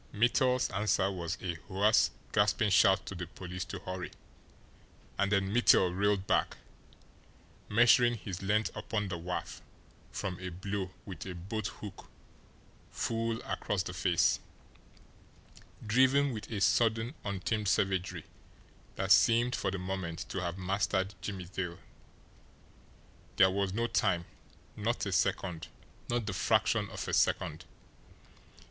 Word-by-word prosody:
Mittel's 125 Hz, +3 st, +2 dB
answer 100 Hz, -1 st, +1 dB
was 85 Hz, -1 st, -4 dB
a 90 Hz, -2 st, -2 dB
hoarse, 105 Hz, +3 st, +3 dB, 0.2 s
gasping 105 Hz, +1 st, +3 dB
shout 95 Hz, 0 st, +5 dB
to -, -, -6 dB
the 90 Hz, -2 st, -5 dB
police 90 Hz, +1 st, -6 dB
to -, -, -6 dB
hurry 90 Hz, 0 st, -5 dB, 1.1 s
and 100 Hz, 0 st, +2 dB
then 100 Hz, -1 st, +1 dB
Mittel 95 Hz, -6 st, +5 dB
reeled 100 Hz, 0 st, +1 dB
back, -, -, +1 dB, 1.1 s
measuring 120 Hz, +2 st, +5 dB
his 95 Hz, -4 st, -6 dB
length 105 Hz, +3 st, 0 dB
upon 105 Hz, -3 st, -2 dB
the 85 Hz, -2 st, -4 dB
wharf 90 Hz, +2 st, -5 dB, 0.5 s
from 90 Hz, -2 st, -4 dB
a 90 Hz, 0 st, -5 dB
blow 95 Hz, +2 st, -4 dB, 0.2 s
with 95 Hz, -2 st, -7 dB
a 90 Hz, -, -5 dB
boat 100 Hz, +4 st, -4 dB
hook 95 Hz, 0 st, -10 dB, 0.8 s
full 115 Hz, 0 st, -2 dB
across 100 Hz, -3 st, -2 dB
the 90 Hz, -, -6 dB
face, 90 Hz, -1 st, +2 dB, 1.5 s
driven 130 Hz, +5 st, +4 dB
with 105 Hz, -1 st, -7 dB
a 105 Hz, -4 st, -3 dB
sudden, 115 Hz, +4 st, +2 dB
untamed 100 Hz, +2 st, -2 dB
savagery 90 Hz, -3 st, 0 dB, 0.7 s
that 95 Hz, 0 st, -1 dB
seemed 115 Hz, +7 st, +5 dB
for 100 Hz, -, -1 dB
the 95 Hz, -, -3 dB
moment 90 Hz, -3 st, -4 dB
to 95 Hz, -, -3 dB
have 85 Hz, 0 st, -3 dB
mastered 95 Hz, +1 st, 0 dB
Jimmie 100 Hz, -3 st, -5 dB
Dale. 90 Hz, -1 st, -4 dB, 1.6 s
There 95 Hz, -1 st, +6 dB
was 100 Hz, 0 st, 0 dB
no 115 Hz, +4 st, 0 dB
time 85 Hz, -7 st, +1 dB, 0.5 s
not -, -, -1 dB
a -, -, -2 dB
second 90 Hz, -4 st, 0 dB, 0.4 s
not 120 Hz, -2 st, 0 dB
the 100 Hz, -, -3 dB
fraction -, -, +2 dB
of -, -, -6 dB
a -, -, -3 dB
second. 80 Hz, +1 st, +1 dB
95 Hz, 130 wpm, -31 LUFS, 90-110 Hz, 1.6 s, There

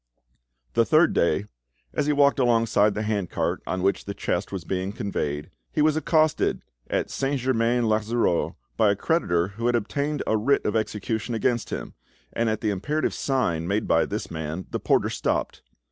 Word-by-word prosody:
The 115 Hz, -, +4 dB
third 155 Hz, +7 st, +4 dB
day, 85 Hz, +4 st, +2 dB, 0.5 s
as 150 Hz, -, 0 dB
he -, -, +3 dB
walked 140 Hz, -1 st, +4 dB
alongside 115 Hz, -4 st, +3 dB
the 105 Hz, -, -2 dB
handcart 105 Hz, -5 st, -1 dB
on 90 Hz, 0 st, -2 dB
which 100 Hz, +1 st, +1 dB
the 100 Hz, -, -5 dB
chest 95 Hz, -1 st, -2 dB
was 95 Hz, -4 st, -4 dB
being 95 Hz, +3 st, -2 dB
conveyed, 75 Hz, -10 st, -3 dB, 0.2 s
he 150 Hz, -, +1 dB
was 155 Hz, 0 st, +3 dB
accosted 155 Hz, -1 st, +2 dB, 0.3 s
at -, -, -1 dB
Saint 140 Hz, 0 st, -1 dB
Germain 120 Hz, -1 st, +1 dB
l'Auxerrois 110 Hz, -4 st, +1 dB, 0.2 s
by 110 Hz, -2 st, +4 dB
a 100 Hz, -, +3 dB
creditor 95 Hz, -, +1 dB
who 115 Hz, +4 st, -3 dB
had 120 Hz, -, +2 dB
obtained 140 Hz, +7 st, -1 dB
a 110 Hz, -, +1 dB
writ 135 Hz, +7 st, +2 dB
of 105 Hz, -, 0 dB
execution 110 Hz, +1 st, -2 dB
against 120 Hz, 0 st, 0 dB
him, -, -, -5 dB, 0.4 s
and 115 Hz, -1 st, +1 dB
at 110 Hz, -, -2 dB
the 110 Hz, -3 st, +1 dB
imperative 150 Hz, +11 st, -1 dB
sign 85 Hz, -, 0 dB
made 100 Hz, +3 st, 0 dB
by -, -, +3 dB
this -, -, -4 dB
man 80 Hz, +2 st, -4 dB
the -, -, -2 dB
porter -, -, +2 dB
stopped. -, -, -2 dB
110 Hz, 175 wpm, -25 LUFS, 100-130 Hz, 0.5 s, The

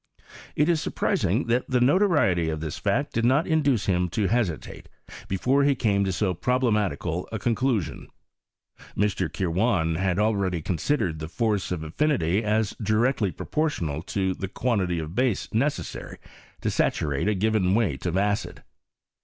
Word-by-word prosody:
It 150 Hz, -, +2 dB
ia 175 Hz, -, +4 dB
surprising 120 Hz, -, 0 dB
tliat 120 Hz, +1 st, +1 dB
the 125 Hz, -1 st, +1 dB
notoriety 125 Hz, -, +3 dB
of 80 Hz, -1 st, -3 dB
this 80 Hz, -1 st, -5 dB
fact 120 Hz, +8 st, 0 dB
did 115 Hz, -, 0 dB
not 135 Hz, +7 st, +3 dB
induce 145 Hz, -8 st, +1 dB
him 90 Hz, -2 st, +1 dB
to 105 Hz, +4 st, -1 dB
hesitate, 105 Hz, -, -2 dB, 0.4 s
before 130 Hz, +9 st, +2 dB
he 140 Hz, 0 st, +3 dB
came 100 Hz, -4 st, +1 dB
to 95 Hz, -, 0 dB
so 95 Hz, 0 st, 0 dB
piroblematical 105 Hz, -7 st, 0 dB
a 110 Hz, -, -2 dB
conclusion* 115 Hz, -, -1 dB, 0.9 s
Mr. 95 Hz, -5 st, 0 dB
Kirwan 90 Hz, -1 st, +1 dB
had 95 Hz, -1 st, 0 dB
al 105 Hz, +1 st, +2 dB
leady 90 Hz, -5 st, -1 dB
considered 90 Hz, -, -1 dB
the 80 Hz, -, -5 dB
force 105 Hz, -2 st, -1 dB
of 85 Hz, -3 st, -2 dB
affinity 100 Hz, -, 0 dB
as 105 Hz, -1 st, 0 dB
directly 110 Hz, 0 st, +1 dB
proportional 85 Hz, -, -2 dB
to 95 Hz, +1 st, -1 dB
the 95 Hz, -, -5 dB
quantity 95 Hz, -5 st, -1 dB
of 80 Hz, 0 st, -5 dB
base 125 Hz, -2 st, 0 dB
necessary 140 Hz, +7 st, -2 dB, 0.4 s
to -, -, 0 dB
saturate 70 Hz, +3 st, 0 dB
a 105 Hz, -, +2 dB
given 100 Hz, -2 st, +2 dB
weight 90 Hz, -, 0 dB
of 90 Hz, +1 st, 0 dB
acid. 100 Hz, +1 st, -1 dB
105 Hz, 155 wpm, -25 LUFS, 90-125 Hz, 0.9 s, ia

